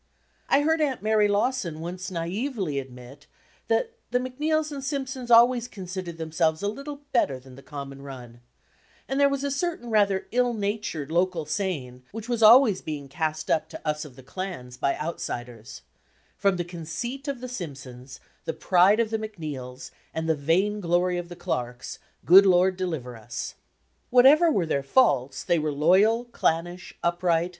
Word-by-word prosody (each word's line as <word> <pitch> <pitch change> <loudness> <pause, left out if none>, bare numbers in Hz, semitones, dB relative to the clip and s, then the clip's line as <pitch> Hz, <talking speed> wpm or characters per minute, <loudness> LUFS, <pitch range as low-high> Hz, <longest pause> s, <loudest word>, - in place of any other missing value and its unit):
I 275 - +5
heard 320 +2 +2
Aunt 270 -7 -1
Mary 215 -1 +3
Lawson 205 -5 0
once 180 +3 -5
naively 185 - -2
admit 130 +2 -11 0.4
that 230 - +1 0.2
"the 250 - +1
Macneills 300 +5 -1
and 275 -2 -6
Simpsons 265 -3 -4
always 240 +1 +6
considered 185 -5 -7
themselves 160 +1 0
a - - +1
little 280 +6 -6
better 140 - +1
than 130 0 -15
the 135 - -12
common 140 -1 -8
run; 125 -4 -10 0.3
" - - -33
and 270 +1 -1
there 280 0 +5
was 275 0 -2
a 280 - -1
certain 280 -5 -3
rather 200 -3 +2
ill 245 0 +2
natured 200 -8 -3
local 175 -1 +1
saying 145 -11 -3
which 225 +1 -7
was 240 -2 -1
always 220 -2 +7
being 145 -3 -6
cast 155 +2 -2
up 155 -1 +1
to - - -9
us 150 0 -1
of 145 -5 -12
the 130 - -14
clans 140 -5 -6
by 140 - 0
outsiders, 120 -8 -6 0.5
"From 195 -2 +1
the 175 - -2
conceit 180 - -6
of 280 -3 -3
the 255 - -6
Simpsons, 135 - -8 0.3
the 160 - -2
pride 190 +4 +4
of 225 -2 +1
the 220 - 0
Macneills, 150 -12 -7 0.2
and 160 0 -2
the 160 - +3
vain 175 +8 +1
glory 175 0 +1
of 175 0 -7
the 175 - -8
Clarks, 125 -8 -4 0.3
good 195 +3 +8
Lord 185 +1 +4
deliver 160 -10 -4
us." 115 +2 -6 0.6
Whatever 275 +7 +6
were 195 - +1
their 140 -3 0
faults, 140 - +2
they 170 - +2
were 155 0 -1
loyal, 190 +11 +3
clannish, 175 -5 -2
upright. 170 0 +1
180 Hz, 170 wpm, -26 LUFS, 150-235 Hz, 0.6 s, good